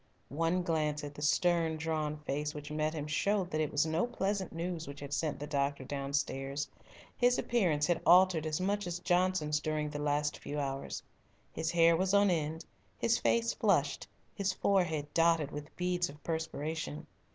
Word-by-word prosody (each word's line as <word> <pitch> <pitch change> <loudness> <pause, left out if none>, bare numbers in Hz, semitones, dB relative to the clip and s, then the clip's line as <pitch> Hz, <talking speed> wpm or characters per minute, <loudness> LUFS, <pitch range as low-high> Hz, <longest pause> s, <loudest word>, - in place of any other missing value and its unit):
One 165 +5 0
glance 155 -3 0
at 145 0 -6
the 145 - -10
stern, 165 +1 +2
drawn 155 -1 -2
face 150 +1 -3
which 150 0 -7
met 155 +1 -1
him 150 -2 -3
showed 185 +5 0
that 155 - 0
it 155 - -1
was 145 +2 +2
no 160 +8 +1
pleasant 200 -5 -2
news 170 0 -4
which 140 +1 -8
had 140 0 -6
sent 155 -2 -1
the 145 - -4
doctor 140 -1 -1
downstairs. 140 0 -2 0.5
His 245 0 +3
appearance 175 -11 +1
had 175 +1 +1
altered 175 -3 +5
as 155 +1 -1
much 200 +1 0
as 175 0 -2
Johnson's 175 -4 +1
during 150 -1 -2
the 145 0 -4
last 145 0 0
few 145 +1 -4
hours. 135 -1 -3 0.5
His 160 - -2
hair 165 0 +5
was 190 +3 +1
on 200 -1 +5
end, 160 0 -2 0.3
his 235 0 +2
face 230 0 +2
flushed, 175 -10 +1 0.3
his 200 -2 0
forehead 175 -7 +1
dotted 165 -3 +3
with 150 +1 -8
beads 180 -1 0
of 145 +1 -13
perspiration. 160 -1 -3
160 Hz, 175 wpm, -32 LUFS, 150-180 Hz, 0.5 s, altered